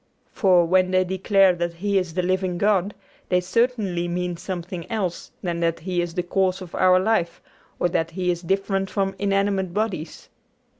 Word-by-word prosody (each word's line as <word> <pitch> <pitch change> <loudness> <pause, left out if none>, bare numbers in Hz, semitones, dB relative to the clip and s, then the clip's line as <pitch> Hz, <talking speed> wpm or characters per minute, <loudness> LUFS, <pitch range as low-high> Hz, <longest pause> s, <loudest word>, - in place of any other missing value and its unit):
For, 180 -3 +4
when 185 +2 +3
they 185 0 +3
declare 190 +1 +3
that 175 -1 -3
He 200 +3 +1
is 175 -3 -5
the 180 - 0
living 185 0 0
God, 200 0 +1 0.3
they 180 - +3
certainly 190 -3 0
mean 175 0 -2
something 175 0 -6
else 190 -6 -3
than 170 -2 -2
that 165 0 0
He 180 0 -1
is 175 -1 -4
the 180 - 0
cause 190 +1 0
of 185 -3 -10
our 185 0 +4
life 185 -4 0 0.4
or - - +2
that 165 -1 0
He 180 +1 -1
is 170 -1 -4
different 195 +1 -1
from 195 -2 -1
inanimate 195 -2 0
bodies. 190 -7 -3
185 Hz, 180 wpm, -23 LUFS, 175-195 Hz, 0.4 s, For